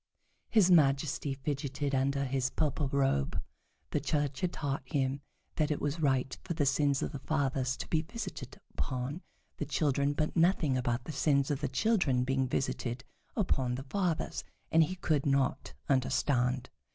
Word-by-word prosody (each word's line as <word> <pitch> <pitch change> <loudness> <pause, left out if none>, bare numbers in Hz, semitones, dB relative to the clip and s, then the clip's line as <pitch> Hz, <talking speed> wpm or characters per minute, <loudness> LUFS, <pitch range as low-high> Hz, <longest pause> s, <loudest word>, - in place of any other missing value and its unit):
His 200 -5 +5
Majesty 140 -3 +3
fidgeted 140 0 -3
under 140 +1 +1
his 130 0 0
purple 150 0 0
robe. 135 - +1 0.5
The - - +1
Church 145 -3 -1
had 180 - +1
taught 140 -4 -2
him 135 +1 -1 0.4
that 155 -2 +2
it 150 - 0
was 145 +3 -2
right 135 -3 +1
for 170 - -3
the 150 -3 +1
sins 140 0 +2
of - - -2
the 140 - -6
fathers 135 -3 0
to - - -5
be 160 - +1
visited 160 - -7
upon 130 +6 -3 0.4
the - - -2
children, 140 -1 +1
but 155 +1 -1
nothing 165 -5 +3
about 120 -1 0
the 155 - -6
sins 140 -1 +2
of 145 - -2
the 145 - 0
children 135 - +2
being 135 0 +1
visited 120 -1 -2 0.3
upon 130 - +1
the 130 - -5
fathers, 170 +2 -1 0.3
and 160 0 +6
he 185 - -5
could 155 -6 0
not 135 - 0
understand. 130 -1 +1
140 Hz, 165 wpm, -31 LUFS, 130-155 Hz, 0.5 s, and